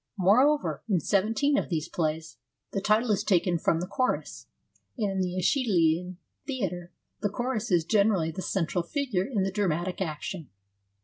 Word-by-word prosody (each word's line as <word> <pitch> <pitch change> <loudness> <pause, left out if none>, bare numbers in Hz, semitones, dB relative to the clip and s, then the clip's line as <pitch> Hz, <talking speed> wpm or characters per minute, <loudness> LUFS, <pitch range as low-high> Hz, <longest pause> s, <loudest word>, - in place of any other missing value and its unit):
Moreover, 255 +11 +3
in 190 -4 +3
seventeen 225 - +2
of - - -5
these 160 -2 -2
plays, 160 -1 -3 0.3
the 195 - -2
title 215 +3 +2
is 205 - +1
taken 175 -2 +2
from 165 - +1
the 175 - -2
chorus, 255 +7 -2 0.5
and 210 -4 0
in 190 0 -1
the 180 -1 -2
^Eschy 260 - +2
lean 175 -1 +2 0.3
Theatre 180 - -3 0.3
the 205 - +1
chorus 240 +1 -2
is 175 -4 +2
generally 200 -4 +2
the 175 - -6
central 175 -2 -1
figure 215 - -1
in 220 -8 0
the 195 - -1
dramatic 180 -2 -1
action. 160 -1 -4
190 Hz, 165 wpm, -27 LUFS, 170-215 Hz, 0.5 s, Moreover